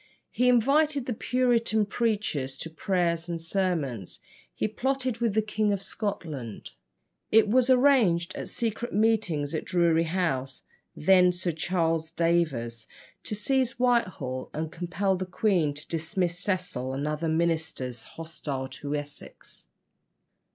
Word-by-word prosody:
He 250 +1 +3
invited 280 +3 +3
the 250 - -1
Puritan 230 -2 +2
preachers 200 - -1
to 165 - -6
prayers 170 -1 0
and 170 -1 -2
sermons; 165 - -1 0.3
he - - -1
plotted 255 +2 -1
with 230 -4 0
the 220 - +3
King 215 0 0
of 200 - 0
Scotland. 165 - -4 0.6
It 220 0 +6
was 250 +4 +3
arranged 245 -10 +4
at - - -5
secret 235 +1 -3
meetings 200 -10 +1
at 160 - -1
Drury 170 -2 +2
House 155 -7 -1 0.3
(then 180 +2 +5
Sir 180 0 -2
Charles 165 -1 0
Daver's) 150 -10 0 0.4
to 210 - -3
seize 260 +4 +1
Whitehall 185 - 0
and 155 +1 -3
compel 180 +3 -1
the 185 0 -4
queen 180 -6 +2
to 150 - -7
dismiss 170 +2 -1
Cecil 180 -10 -2
and 140 +2 -2
other 150 +2 -1
ministers 160 -7 -1
hostile 150 -3 -5
to 140 +3 -4
Essex. 145 -1 -6
175 Hz, 130 wpm, -27 LUFS, 155-220 Hz, 0.6 s, It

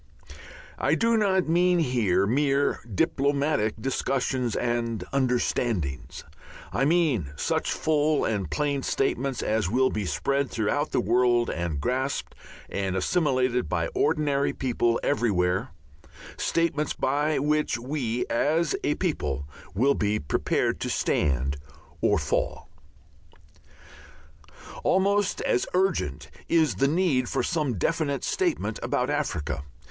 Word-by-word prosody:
I - - +2
do 230 0 +2
not 190 -5 +2
mean 175 +2 +3
here 120 - +2
mere 140 +5 +1
diplomatic 140 - +1
discussions 130 -1 -1
and 120 -2 -1
"understandings," 120 - -1 0.5
I 135 - +1
mean 145 - +2
such - - -1
full 155 -1 +1
and 100 -7 -1
plain 145 - -1
statements 135 -1 -1
as 110 -4 0
will 130 +4 +2
be 105 -3 -2
spread 140 +4 0
through 110 -3 -1
the - - +1 0.2
whole - - +2
world 120 -1 +2
and 85 -4 -3
grasped 130 - -2 0.3
and 95 -2 -2
assimilated 130 - +1
by 85 -1 -1
ordinary 145 -2 +1
people 120 -2 0
everywhere, 100 -4 +1 0.7
statements 155 -3 0
by 145 +3 0
which 150 -1 +1
we, 125 -2 -2
as 155 +5 +1
a 150 - +1
people, 75 - -2 0.3
will 135 +7 +3
be 105 -3 0
prepared 70 - 0
to - - -3
stand 70 -1 0 0.4
or - - +3
fall. - - -2 2.1
Almost 200 +1 +2
as 125 - +1
urgent 180 - 0 0.2
is 155 - +3
the 135 - +3
need 145 -6 +1
for - - 0
some 150 - -1
definite 145 - -1
statement 340 - -1
about 125 +3 0
Africa. 85 - -2
130 Hz, 120 wpm, -26 LUFS, 110-150 Hz, 2.1 s, mean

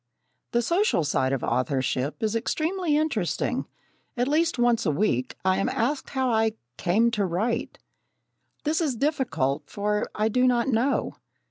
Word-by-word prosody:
The 240 0 +1
social 340 - +2
side 135 -3 +1
of 135 -3 -1
authorship 130 - -1
is 220 0 0
extremely 315 +7 0
interesting. 280 - -1 0.5
At 245 +1 +1
least 325 +2 +1
once 240 -1 +3
a 170 - +1
week, 140 - 0
I 185 0 +3
am - - +1
asked 265 +5 -1
how 260 -2 0
I 220 -1 +2 0.2
"came 215 - +2
to 210 -3 0
write." 195 +6 -1 0.9
This 315 +2 +1
is 290 -6 0
difficult, 165 - -1
for 210 +1 -1
I 215 +1 +1
do 250 +3 +3
not 240 -1 +2
know. 250 +3 0
230 Hz, 150 wpm, -26 LUFS, 180-270 Hz, 0.9 s, once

